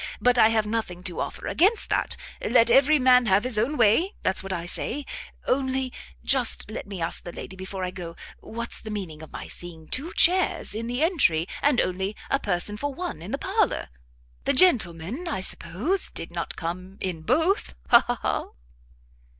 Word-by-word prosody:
But 250 0 +3
I 220 - +7
have 220 -1 +1
nothing 210 -5 -3
to 175 - -4
offer - - -4
against 410 +6 +2
that; - - 0 0.3
let 235 0 +4
every 275 +5 +6
man 255 -2 +5
have 195 +2 +4
his 250 -4 +2
own 275 +7 0
way; 240 - +3
that's 190 - +1
what 195 - -7
I 170 -2 -3
say. 275 +10 -1 0.4
Only 260 -1 0 0.3
just 250 -5 +3
let 215 - -6
me 200 -2 -6
ask 165 0 -2
the 175 - -7
lady 190 - -8
before 190 0 -6
I 180 - -2
go, 175 -3 -8 0.2
what's 235 +1 -6
the 220 - -8
meaning 185 -7 -5
of 160 - -11
my - - -7
seeing 165 -3 -8
two 310 +7 -3
chairs 365 - +3
in 225 +2 -3
the 245 +5 -1
entry, 185 - +3
and 285 -4 +3
only 190 +3 -1 0.2
a 275 - +3
person 200 0 -1
for 285 +5 -2
one 345 - -5
in 175 - -8
the 275 - -2
parlour? 385 - 0 0.6
The - - +2
gentleman, 245 - +2
I 265 - -2
suppose, 200 - 0
did - - -7
not - - -4
come 185 +3 -6
in 180 -4 -3
both; 325 - +1
ha! 235 0 +8
ha! 245 0 -1
ha!" - - 0
225 Hz, 190 wpm, -25 LUFS, 185-275 Hz, 0.6 s, ha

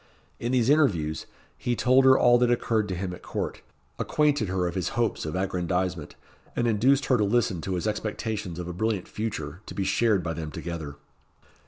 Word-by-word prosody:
In 120 - -2
these 125 +1 +3
interviews, 90 - +2 0.3
he 120 - 0
told 130 +2 +4
her 130 0 +7
all 120 0 +5
that 125 -1 +3
occurred 115 -3 +1
to 95 - -3
him 90 0 -3
at - - -10
court - - -4 0.4
acquainted 145 -7 +1
her 90 -1 0
of 85 - -2
his 90 -2 -1
hopes 115 -8 0
of 75 - -4
aggrandisement 90 -3 -2 0.4
and 120 - +1
induced 130 +6 +3
her 130 - +3
to - - +3
listen 105 -4 +1
to 95 +2 -2
his 90 - -3
expectations 105 -3 -3
of 90 -1 -5
a 90 - -4
brilliant 105 0 -1
future, 95 -7 -5
to - - -8
be 100 - -1
shared 100 0 +2
by 85 - -2
them 80 -1 -5
together. 80 -3 -6
100 Hz, 195 wpm, -26 LUFS, 90-120 Hz, 0.4 s, her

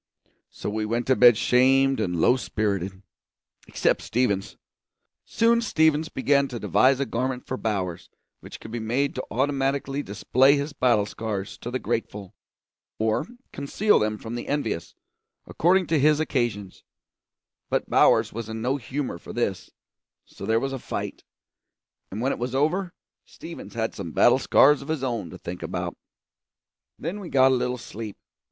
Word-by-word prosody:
So - - -8
we 110 +1 -2
went 115 +3 -1
to 130 - +3
bed 120 -3 +7
shamed 135 +3 +3
and 90 -1 -1
low 120 - +5
spirited; 100 -5 -2 0.6
except - - +1
Stevens. 110 -5 -1 0.7
Soon 230 +1 +2
Stevens 160 -7 +2
began 140 +1 +2
to 120 -3 -6
devise 130 +3 +3
a 140 - 0
garment 125 +1 -3
for 130 - -3
Bowers 95 -8 -3 0.3
which - - -11
could 110 - -10
be 120 - -3
made 125 +6 0
to 130 - -4
automatically 135 +2 -1
display 130 +6 +3
his 145 +1 -3
battle 120 -6 +2
scars 105 -2 -5
to 120 - -6
the 125 - -1
grateful, 105 -5 -4 0.6
or 110 +9 0 0.3
conceal 195 +9 +2
them 105 0 -1
from 110 +2 -8
the 120 - -5
envious, 135 - -3 0.5
according 185 +3 +2
to 160 -2 +1
his 150 +2 +4
occasions; 120 -10 -2 0.9
but - - 0
Bowers - - +4
was 115 0 -6
in 110 0 -5
no 125 +5 0
humour 130 -6 -4
for - - -10
this, - - -2 0.6
so 100 - -9
there 110 0 +3
was 135 +2 -3
a 135 - -4
fight, - - -5 0.9
and 105 +4 -5
when 135 +3 +1
it - - -4
was 125 +2 -3
over 170 +6 0 0.3
Stevens - - -10
had - - -1
some - - -7
battle - - +5
scars 145 0 +5
of 140 - -10
his 155 -4 -2
own 115 -8 -2
to - - -9
think 90 +1 -7
about. - - -4 1.0
Then 175 +7 -4
we 185 -4 -8
got 130 -1 +5
a - - +3
little 125 0 -1
sleep. 110 -1 -8
125 Hz, 165 wpm, -25 LUFS, 110-140 Hz, 1.0 s, bed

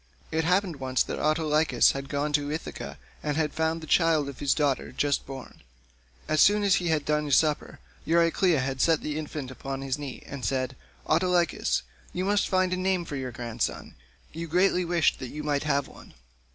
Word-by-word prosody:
It 160 +1 0
happened 180 -2 +1
once 130 -1 +1
that - - -5
Autolycus 155 0 +3
had 135 0 -6
gone 145 +1 -1
to 145 0 +1
Ithaca 155 - -5 0.2
and 150 -1 -2
had 155 -2 0
found 160 +1 0
the - - -7
child 160 -3 +3
of 140 - -9
his 140 - +2
daughter 145 -3 0
just 140 +2 0
born. 135 -1 -9 0.7
As 155 -1 +3
soon 205 +1 +5
as 195 -1 +4
he 175 - -2
had 155 -3 +1
done 150 -1 0
supper 150 +2 +2 0.3
Euryclea 165 -5 +2
set 160 +2 +3
the 150 0 -3
infant 150 -4 -5
upon 135 +1 -5
his 135 +1 -2
knees 140 -3 -7
and 140 -2 -8
said, 130 -1 -1 0.3
"Autolycus, 175 +1 +1 0.3
you 180 +1 -2
must 205 0 +2
find 185 -1 +2
a - - 0
name 185 -1 0
for 145 - -6
your 130 -2 -4
grandson; 120 -1 -4 0.4
you 165 +1 -5
greatly 180 +2 +3
wished 170 -2 +2
that 130 - -6
you 150 +3 -6
might 145 -1 0
have 140 -2 +1
one." - - -15
150 Hz, 190 wpm, -27 LUFS, 140-170 Hz, 0.7 s, soon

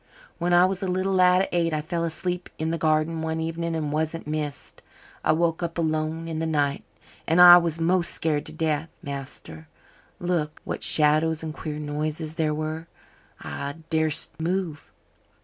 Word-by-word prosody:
When 175 +1 0
I 175 +1 +6
was 185 0 -1
a 190 - -2
little 185 +1 0
lad 185 0 +5
of - - -2
eight 170 -2 +1
I 155 - 0
fell 170 +1 -2
asleep 180 +2 -3
in 160 +1 -2
the 165 - -2
garden 155 +1 +1
one 160 0 -2
evening 165 +1 -3
and 150 -2 -2
wasn't 160 +2 -2
missed. 150 -1 -5 0.4
I - - +3
woke 165 +1 +1
up 170 0 -3
alone 160 0 -1
in 160 -1 -4
the 165 - -1
night 145 -3 0 0.4
and 165 +2 +3
I 175 0 +11
was 170 -2 0
most 170 +1 +2
scared 150 -2 -1
to - - -8
death, 160 0 -2
master. 135 - -8 0.5
Lord, 175 -4 -1
what - - -5
shadows 155 +1 +3
and 155 -1 -4
queer 155 -1 -6
noises 150 +1 -3
there 160 -1 0
were! 155 +2 -4 0.5
I 140 0 -5 0.2
darsn't 160 -1 +3
move. 170 -2 -3
160 Hz, 175 wpm, -25 LUFS, 155-170 Hz, 0.5 s, I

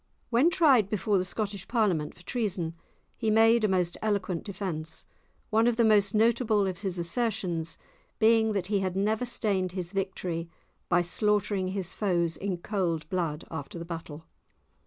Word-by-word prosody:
When 250 +8 +5
tried 275 - +4
before 205 -1 +1
the - - 0
Scottish 200 0 -4
Parliament 195 -11 0
for 175 - -17
treason, 190 -8 -2 0.4
he 225 - -1
made 225 +1 +5
a - - +4
most 180 -3 0
eloquent 195 -5 -1
defence, 175 -6 -5 0.5
one 225 +2 +4
of 240 - +2
the 230 0 +3
most 210 -2 +4
notable 220 -2 +3
of 185 -3 -3
his 190 -3 -3
assertions 170 -3 -2 0.4
being 220 0 +4
that 195 -3 -1
he 200 +1 0
had 185 -1 -2
never 215 +5 0
stained 195 -6 -1
his 180 -2 -4
victories 185 -4 -3 0.4
by 175 - +4
slaughtering 205 +1 0
his 185 -2 -3
foes 170 -5 0
in 190 -2 -3
cold 170 -5 -2
blood 165 -5 -2
after 160 0 -6
the 170 - -6
battle. 165 -2 -7
195 Hz, 160 wpm, -28 LUFS, 175-215 Hz, 0.5 s, When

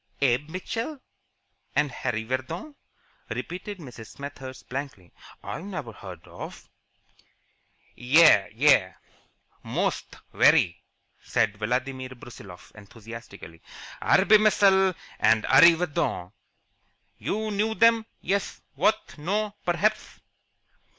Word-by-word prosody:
"Abe 135 +2 +1
Mitchell 230 - -5 0.8
and 145 -2 +2
Harry 110 -2 -3
Vardon?" 130 - -4 0.6
repeated 195 +3 -6
Mrs. 125 -9 -11
Smethurst, 135 -2 -9
blankly. 130 - -7 0.3
"I - - -6
never 185 - -6
heard 95 -5 -11
of - - -10 0.7
" - - -39 0.2
"Yais! 155 -12 +7
Yais! 110 - +3 0.7
Most! - - -3 0.2
Very!" 85 - +4 0.4
shouted 105 -1 0
Vladimir 130 +3 -2
Brusiloff, 100 -7 -13
enthusiastically. 105 -4 -12 0.4
"Arbmishel 195 -2 +4 0.2
and 110 -1 +3
Arreevadon. 165 - +3 0.9
You 215 +1 -2
know 215 +2 0
them, 230 -1 +4
yes, 195 +2 -2
what, 215 - 0
no, 205 +6 -1
perhaps?" 210 +5 -1
145 Hz, 90 wpm, -26 LUFS, -, 0.9 s, Yais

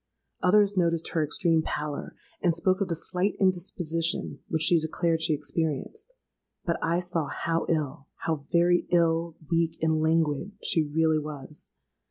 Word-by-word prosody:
Others 205 +2 +4
noticed 170 -3 +1
her 160 - 0
extreme 160 +2 +2
pallor, 150 -2 -4 0.3
and 175 -3 +2
spoke 185 +4 +1
of 200 - +1
the 170 - -1
slight 180 +4 -1
indisposition 175 -2 0
which 160 -1 -1
she 170 0 +4
declared 160 +1 0
she 160 -1 +2
experienced: 160 - -3 0.5
but 170 - 0
I 170 +1 +1
saw 175 -4 -1
how 165 +3 -2
ill—how 150 0 -3
very 175 0 +3
ill, 165 -1 +2 0.2
weak, 165 -1 +1
and 160 -1 +2
languid 160 +3 +1
she 165 - +3
really 160 -1 +3
was. 150 -1 -9
165 Hz, 145 wpm, -27 LUFS, 155-175 Hz, 0.5 s, Others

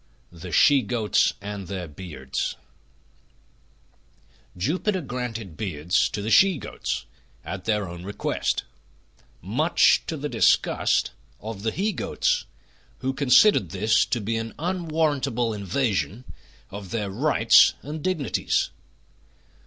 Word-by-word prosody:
THE 85 +1 -9
SHE 145 - +5
GOATS 110 -1 +1
AND 100 -2 -6
THEIR 90 -3 -5
BEARDS 75 -5 -5 2.0
Jupiter 180 - 0
granted 120 - -5
beards 90 -3 0
to 105 - -4
the 110 - -2
She 190 - +5
Goats 65 - -4 0.4
at 95 -2 -6
their 105 -3 0
own 85 0 -8
request, 100 +2 -2 0.8
much - - +3
to - - -3
the - - -3
disgust - - +2 0.3
of 110 -2 -7
the 110 - 0
he 200 - -1
Goats, - - 0 0.6
who 130 +1 -1
considered 140 - +4
this 105 +5 +2
to 120 - -1
be 115 +2 -2
an 115 0 -5
unwarrantable 155 -9 -1
invasion 105 +2 -1 0.5
of 100 -1 -8
their 105 -2 -3
rights 115 0 +5
and 150 +2 -6
dignities. 180 -7 0
110 Hz, 115 wpm, -24 LUFS, 95-140 Hz, 2.0 s, SHE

